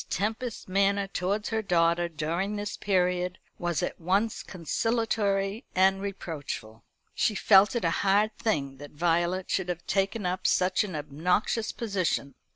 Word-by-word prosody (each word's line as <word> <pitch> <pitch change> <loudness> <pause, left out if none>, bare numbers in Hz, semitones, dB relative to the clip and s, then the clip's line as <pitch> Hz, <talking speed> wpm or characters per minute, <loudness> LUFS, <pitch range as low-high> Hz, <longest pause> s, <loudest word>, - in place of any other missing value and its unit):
Tempest's 225 +3 -2
manner 200 +1 +2
towards 195 +2 -2
her 220 -1 0
daughter 170 -3 +2
during 170 +6 -2
this 205 0 -4
period 180 -1 0 0.2
was 175 0 -1
at 175 - -4
once 200 +6 +1
conciliatory 205 - -1
and 190 +1 +4
reproachful. 150 - -6 0.3
She 215 - +1
felt 195 +2 +5
it 230 -7 0
a 165 - +2
hard 205 +2 +3
thing 140 - -1
that 145 +1 -10
Violet 175 +3 0
should 185 -2 0
have 175 -1 -4
taken 195 +1 0
up 185 +1 0
such 185 +4 +2
an 190 -5 -5
obnoxious 175 +9 0
position. 190 -10 -1
190 Hz, 145 wpm, -28 LUFS, 170-205 Hz, 0.3 s, felt